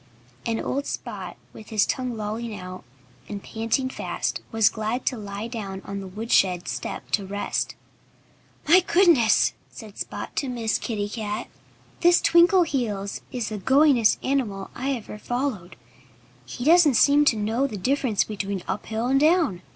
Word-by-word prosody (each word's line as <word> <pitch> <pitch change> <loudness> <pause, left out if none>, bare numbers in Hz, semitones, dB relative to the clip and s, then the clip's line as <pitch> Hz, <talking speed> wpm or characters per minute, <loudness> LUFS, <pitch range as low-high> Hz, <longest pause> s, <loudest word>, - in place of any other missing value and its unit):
And 225 -1 0
old 280 +2 -2
Spot, - - -6 0.2
with 215 - -12
his 215 -2 +2
tongue 250 -3 -2
lolling 215 +1 -4
out, 185 0 -8 0.5
and 200 -1 -6
panting 225 +4 -1
fast, 260 - -3
was 225 -1 +4
glad 220 +3 -2
to 255 - +1
lie 205 0 -6
down 205 -5 -6
on 200 0 -5
the 195 - -7
woodshed 185 -3 +1
step - - -5
to 205 - +1
rest. 200 +1 -2 0.9
"My 345 +4 +8
goodness!" 340 - +4 0.2
said 215 -3 -12
Spot - - -6
to 275 - -1
Miss 230 -3 -1
Kitty 205 -3 -3
Cat. 215 +1 -4 0.5
"This 350 0 +5
Twinkleheels 280 - +2
is 240 -4 -3
the 215 -1 -5
goingest 265 0 +4
animal 225 -8 -1
I 270 +2 -2
ever 215 -3 -7
followed. 245 -8 -3 0.7
He 245 - -6
doesn't 320 -4 +6
seem 285 +5 +5
to 255 - +4
know 225 +6 0
the 215 - -6
difference 250 +1 +1
between 200 -3 -4
uphill 220 +4 -3
and 270 +2 +3
down. 305 - +3
225 Hz, 150 wpm, -24 LUFS, 205-270 Hz, 0.9 s, My